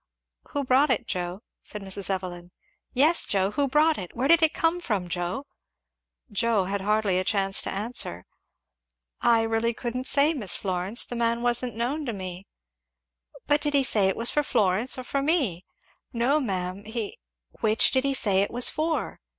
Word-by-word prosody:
"Who 285 - -1
brought 270 +3 +3
it, 255 - 0
Joe?" 180 +2 -4 0.2
said 210 -1 -7
Mrs. 195 0 -1
Evelyn. 180 -2 -4 0.4
"Yes, 305 +6 +3
Joe, 195 0 +1
who 280 +5 0
brought 305 +3 +2
it? 180 -2 -8
where 255 +3 0
did 335 +2 +5
it 320 -1 +4
come 330 +2 0
from, 210 - -2
Joe?" 175 +9 -3 0.9
Joe 220 -1 +1
had 195 +2 -3
hardly 205 -2 +1
a - - -1
chance 195 0 +1
to - - -3
answer. 200 - -3 1.0
"I 230 -1 +4
really 225 +1 0
couldn't 250 +2 -4
say, 290 +3 +4
Miss 215 - 0
Florence, 185 +3 +1
the 245 - -6
man 235 0 0
wasn't 240 -1 +2
known 265 +6 -2
to 235 - -2
me." 185 -1 -7 1.0
"But 290 0 +2
did 295 -1 0
he 275 - +4
say 210 -6 +3
it 190 - -1
was 230 +1 +1
for 295 - +2
Florence 225 -3 +1
or 255 - -5
for 275 +2 -2
me?" 275 - 0 0.5
"No 250 +5 +1
ma'am 190 -5 -3
he" 220 -1 -5 0.4
"Which 220 0 +3
did 260 -1 +2
he 275 -1 0
say 195 -6 +3
it 200 - 0
was 245 +1 +2
for?" 315 +1 -2
230 Hz, 180 wpm, -26 LUFS, 195-270 Hz, 1.0 s, did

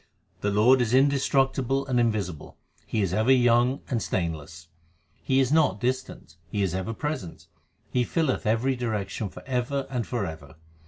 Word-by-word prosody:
The 105 - -1
Lord 115 +6 +4
is 120 +1 +1
indestructible 135 -1 +2
and 125 -2 +1
invisible; 100 -9 -2 0.3
He 110 - 0
is 95 -2 -1
ever 110 +6 +3
young 125 +1 +4
and 120 -4 -1
stainless. 85 -2 -4 0.5
He 135 0 +2
is 135 0 +2
not 150 -11 +3
distant; 125 - -3
He 100 +3 -1
is 95 -3 -1
ever 95 +5 -3
present; 130 - -5 0.5
He 125 - +2
filleth 135 -4 -1
every 120 +5 +1
direction 110 -4 -3
for - - -12
ever 130 +2 -1
and 125 -4 -2
for 120 -5 -2
ever. 80 -3 -9
120 Hz, 160 wpm, -26 LUFS, 100-130 Hz, 0.5 s, Lord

